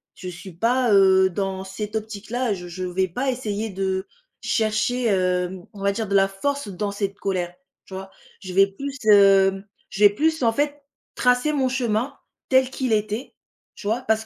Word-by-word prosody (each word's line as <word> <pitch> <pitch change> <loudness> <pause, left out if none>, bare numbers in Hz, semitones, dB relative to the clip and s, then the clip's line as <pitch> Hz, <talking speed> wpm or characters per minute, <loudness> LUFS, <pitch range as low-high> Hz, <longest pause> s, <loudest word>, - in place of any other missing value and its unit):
je 185 - -9
suis 180 +2 -9
pas, 235 +6 +1
heu, 190 -1 +6
dans 190 +1 -3
cette 205 +3 -6
optique-là, 220 +2 -2
je 180 -2 -7
je 180 +2 -6
vais 185 +1 0
pas 250 +10 -2
essayer 220 -4 -3
de 190 0 -2 0.4
chercher, 220 +3 0
hem, 185 -3 0
on 200 - -11
va 200 - +3
dire, 220 +2 -3
de 200 - -1
la 195 0 +5
force 280 +7 -3
dans 200 +1 -3
cette 200 -1 -3
colère. 180 -3 -2 0.3
Tu - - -13
vois? 190 0 -7 0.3
Je 185 -3 -7
vais 195 +1 +7
plus, 275 +8 -6
hem, 195 -2 +5 0.3
je 205 - -1
vais 205 - +10
plus 315 +9 0
en 230 - +4
fait 290 +4 -1 0.3
tracer 250 +4 +2
mon 265 -3 +1
chemin, 250 +1 -1 0.3
tel 260 -1 +4
qu'il 260 -2 -2
était, 215 +4 -2 0.4
tu - - -12
vois? 225 +4 0
Parce 220 -3 0
205 Hz, 185 wpm, -23 LUFS, 190-245 Hz, 0.4 s, vais